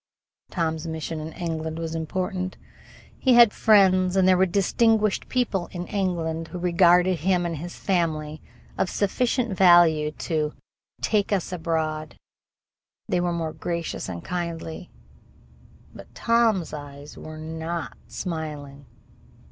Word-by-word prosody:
Tom's 160 -2 -2
mission 160 0 -4
in 155 +1 -6
England 160 -2 -4
was 165 -1 -4
important. 185 +3 -3 0.6
He 255 -2 +4
had 235 -3 +7
friends, 185 -3 +4
and 190 -1 +4
there 185 - +6
were 190 +1 +3
distinguished 215 +3 +2
people 220 -8 -1
in 175 -1 -5
England 165 -5 -2
who 180 - -7
regarded 180 0 +4
him 180 +2 +1
and 165 -2 -3
his 175 +4 -7
family 155 -5 -1 0.4
of 185 - +1
sufficient 235 +2 0
value 175 -5 +5
to 155 -1 -2 0.5
"take 210 -2 +1
us 195 -2 0
aboard." 160 -2 -2 0.9
They 175 - +1
were 175 0 0
most 160 -2 -4
gracious 170 - -3
and 85 -2 -6
kindly. 170 -1 -5 1.0
But - - -13
Tom's 230 -7 +2
eyes 145 0 -9
were 155 0 -9
not 160 +2 -5
smiling. 150 -5 -6
170 Hz, 125 wpm, -25 LUFS, 160-185 Hz, 1.0 s, had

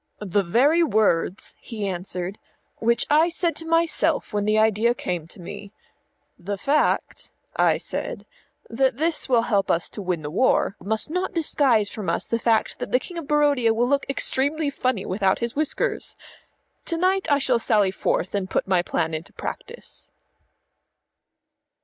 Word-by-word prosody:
"The 205 -1 0
very 265 - +3
words," 210 - +1
he 220 -4 -5
answered, 180 +1 -4 0.4
"which 235 +1 +2
I 315 +3 +5
said 340 0 -1
to 325 - -6
myself 330 -7 +1
when 205 -1 0
the 215 +1 +2
idea 220 +2 +3
came 175 -7 -4
to 175 - -12
me. 195 +3 -9 0.7
'The 200 +3 -4
fact,' 285 +9 0 0.3
I - - +3
said, - - -5 0.4
'that 260 +1 +1
this 320 -1 -1
will 235 -3 +4
help 200 -4 +1
us 170 - +1
to 210 - -7
win 180 -4 -2
the 150 - -5
war, 200 0 +2
must 220 +8 -1
not 365 +2 -2
disguise 265 -10 +2
from 210 -4 -4
us - - -1
the 230 - -1
fact 225 -1 +1
that - - -5
the 250 - +5
King 345 +4 -7
of 310 - -9
Barodia 285 -6 +3
will 240 +2 +2
look 280 +1 +1
extremely 285 +2 0
funny 255 -7 -1
without 190 0 +1
his 235 0 -3
whiskers.' 310 - -2 0.7
To 335 - -1
night 375 0 +1
I 285 - +5
shall 255 -4 +1
sally 210 -4 +2
forth 185 - -1
and 195 -2 -2
put - - -1
my 185 -2 +3
plan 160 -2 -2
into 160 +1 -6
practice." 475 +2 -8
230 Hz, 165 wpm, -24 LUFS, 195-290 Hz, 0.7 s, I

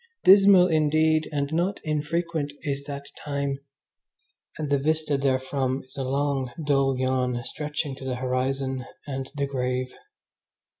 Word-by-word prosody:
Dismal 195 -1 +8
indeed, 155 -1 +2
and 145 0 -2
not 180 +5 0
infrequent, 155 0 -1
is 140 -2 -3
that 140 -1 -6 0.2
time, 140 -1 -2 1.0
and 155 - -3
the 140 - +3
vista 155 +1 +1
therefrom 130 -1 0
is 130 - -14
a 135 - -2
long, 135 -1 0
dull 135 -2 +2
yawn 130 -2 0
stretching 150 0 -3
to - - -10
the 130 -1 -2
horizon 130 +1 -1 0.2
and 135 -2 -4
the 140 -1 0
grave. 130 -1 -2
140 Hz, 135 wpm, -26 LUFS, 130-155 Hz, 1.0 s, Dismal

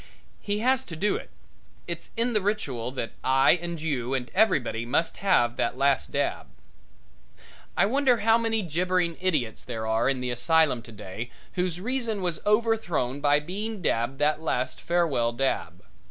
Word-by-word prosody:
He 205 0 -2
has 260 0 +3
to 165 - -7
do 205 +6 +1
it; - - -6 0.6
it's - - -6
in 235 +1 +1
the 210 - +2
ritual 140 - -2
that 115 -4 -4
I 135 +1 +5
and 170 -1 -5
you 135 -5 -1
and 125 -2 -4
everybody 130 - +2
must 145 +8 0
have 120 -12 +2
that 120 - -1
last 135 - +2
dab. - - -1 1.3
I - - +5
wonder 255 +1 +2
how 225 +2 +4
many 225 -2 0
gibbering 175 +1 0
idiots 150 -12 0
there 115 -3 -5
are 110 +3 +2
in 135 -2 0
the 125 0 -2
asylum 155 0 +3
today 110 0 -8 0.2
whose 180 -2 -1
reason 225 -2 -2
was 175 -2 -1
overthrown 210 - +1
by 145 0 +4
being 205 +7 -5
dabbed 125 -5 0
that 150 +2 +1
last 130 -5 -2
farewell 155 -9 +1
dab. 135 +3 -2
160 Hz, 160 wpm, -26 LUFS, 125-205 Hz, 1.3 s, I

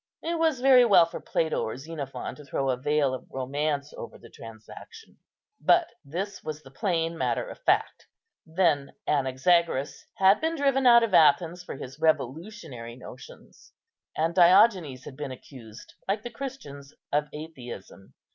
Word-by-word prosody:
It 335 0 -2
was 320 -6 +1
very 260 -1 +7
well 195 -7 +6
for 165 - -8
Plato 160 -1 -1
or 110 - -4
Xenophon 145 -1 -6
to 150 - -13
throw 135 0 -1
a - - 0
veil 145 +1 0
of 130 - -7
romance 140 +2 -3
over - - -9
the - - -16
transaction, 115 - -13 0.4
but 345 -1 +4
this 185 +8 -5
was 155 0 -6
the 135 - -15
plain 165 +1 -1
matter 170 - -1
of - - -10
fact. - - 0 0.4
Then 160 -5 0
Anaxagoras 140 +1 +1
had 195 +1 +4
been 325 +1 0
driven 275 -3 +2
out 235 -1 +7
of 225 -4 -2
Athens 170 +2 +4
for - - -7
his 135 +1 -9
revolutionary 155 - -2
notions; 125 0 -14 0.4
and 165 +2 0
Diogenes 180 - +4
had 135 - -9
been 145 -1 -6
accused, 125 -3 -12
like 205 +2 -1
the 240 - -7
Christians, 190 - -9 0.2
of 150 +1 +1
atheism. 125 -11 -10
160 Hz, 155 wpm, -26 LUFS, 135-200 Hz, 0.4 s, very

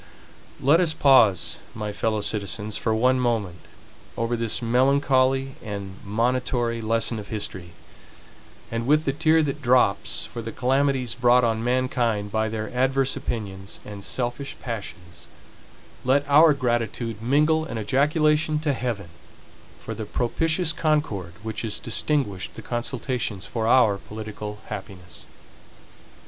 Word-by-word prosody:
Let 145 +5 +4
us 165 -3 +3
pause, 115 - +4 0.2
my 105 -2 -4
fellow 110 +1 -1
citizens, 105 +1 -2
for 110 -1 0
one 125 +3 +3
moment, 110 -8 -1 0.6
over 115 +1 0
this 115 -2 0
melancholy 130 +2 +2
and 100 -3 -7
monitory 120 +2 0
lesson 115 +1 0
of 100 - -8
history; 95 -5 -5 1.0
and 115 +1 -2
with 155 +2 +3
the 135 - +1
tear 160 +2 +3
that 140 -2 -3
drops 120 -5 +2
for 120 - -7
the 115 0 -6
calamities 130 0 +1
brought 120 +1 +4
on 115 -1 0
mankind 120 -4 0
by 110 +1 0
their 110 +1 -5
adverse 135 +1 +2
opinions 100 -3 -5
and 100 -1 -8
selfish 125 +5 -3
passions, 90 -7 -7 0.8
let 140 +3 +2
our 150 +1 +6
gratitude 120 -3 -2
mingle 150 +6 +2
an 115 - -5
ejaculation 150 +7 +2
to 150 -2 0
Heaven, 115 -9 -3 0.7
for - - -5
the 110 - -5
propitious 160 - 0
concord 150 - -1
which 110 -1 -4
has 110 -3 -2
distinguished 115 -6 -1
the - - -9
consultations 120 -4 -3
for 115 -2 -2
our 110 -5 +4
political 105 0 -7
happiness. 90 -4 -9
120 Hz, 130 wpm, -24 LUFS, 105-135 Hz, 1.0 s, our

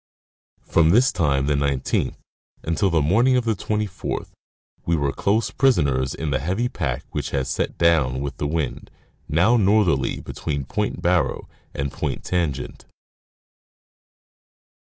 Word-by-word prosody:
From 80 -1 +3
this 120 +9 +5
time, 70 -4 +1
the 75 - +1
19th, 70 -2 0 0.5
until 85 +5 +1
the 80 -4 +2
morning 120 - +3
of 125 - 0
the 115 - +2
24th, 105 -2 -3 0.5
we 85 - +1
were 70 -3 0
close 105 +9 0
prisoners 70 - +2
in 80 -2 -3
the 65 - +1
heavy 95 - -1
pack - - -3
which - - -3
had 70 -2 -1
set - - -2
down 75 -7 +3
with 70 0 -4
the 75 - -2
wind, 75 -3 -3 0.4
now 90 +11 +4
northerly, 100 - +2
between 70 -4 -4
Point - - -3
Barrow - - +1 0.3
and 70 0 -2
Point. - - -4
Tangent. 85 -7 -2
80 Hz, 135 wpm, -23 LUFS, 70-100 Hz, 0.5 s, this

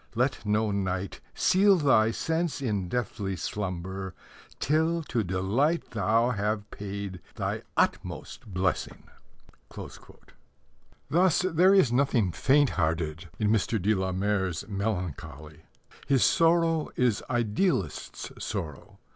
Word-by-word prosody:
Let 125 +2 0
no 105 +1 +2
night 95 -1 -2
Seal 195 +1 +4
thy 135 -8 +4
sense 160 +7 -1
in 105 -9 -2
deathly 100 -4 -2
slumber 95 -1 -4 0.4
Till 160 +3 +1
to 120 -6 -1
delight 100 - 0
Thou 115 +4 +2
have 105 -1 -1
paid 100 -2 -6
thy - - -2 0.2
utmost - - -1
blessing. 90 -2 -2 2.1
Thus, 175 +3 +3
there 185 +2 +4
is 165 -12 +5
nothing 120 -7 +2
faint 140 - +3
hearted 80 +1 -1
in 105 -2 +1
Mr. 110 +1 +1
de 105 +4 +2
la 95 -2 -1
Mare's 95 -2 -1
melancholy. 90 -8 -4 0.4
His 135 -3 +3
sorrow 165 -2 +3
is 125 -4 +2
idealist's 120 - -1
sorrow. 85 -9 -5
105 Hz, 110 wpm, -28 LUFS, 95-140 Hz, 2.1 s, is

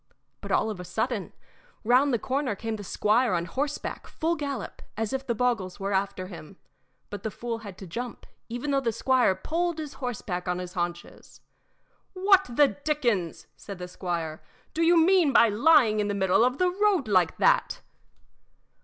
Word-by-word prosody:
But - - -7
all 220 - +2
of 200 - -7
a - - -6
sudden, 220 +3 -2 0.5
round 255 +5 +4
the 240 - +2
corner 260 -1 -2
came 225 +2 -4
the 205 - -7
squire 215 +4 +1
on 170 0 -1
horseback, 280 - -4
full 330 +1 -1
gallop, 280 -8 -5 0.2
as 225 +2 -2
if 265 0 -3
the 235 - 0
boggles 220 -7 -1
were 200 +1 -2
after 190 -1 -1
him; 185 0 -11 0.5
but 205 - -6
the 220 - -3
fool 230 +2 -5
had 200 -4 -10
to 195 - -9
jump, 235 +7 -6 0.2
even 245 +5 -3
though 275 - +3
the 235 -3 0
squire 250 -3 +2
pulled 335 - -2
his 305 -3 -6
horse 245 -3 -4
back 180 -1 -4
on 180 0 0
his 180 0 -6
haunches. 175 -2 -5 0.7
"What 385 0 +4
the 275 +4 +4
dickens," 245 - -1
said 200 -2 -9
the 180 0 -6
squire, 170 -3 -4 0.3
"do 325 - -2
you 340 +1 +5
mean 335 -4 +4
by 230 - +6
lying 230 -1 +4
in 205 - 0
the 205 - -1
middle 190 +2 +3
of 250 +2 +1
the 365 0 +2
road 390 - +1
like 185 -5 +2
that?" - - +2
230 Hz, 185 wpm, -27 LUFS, 190-285 Hz, 0.7 s, by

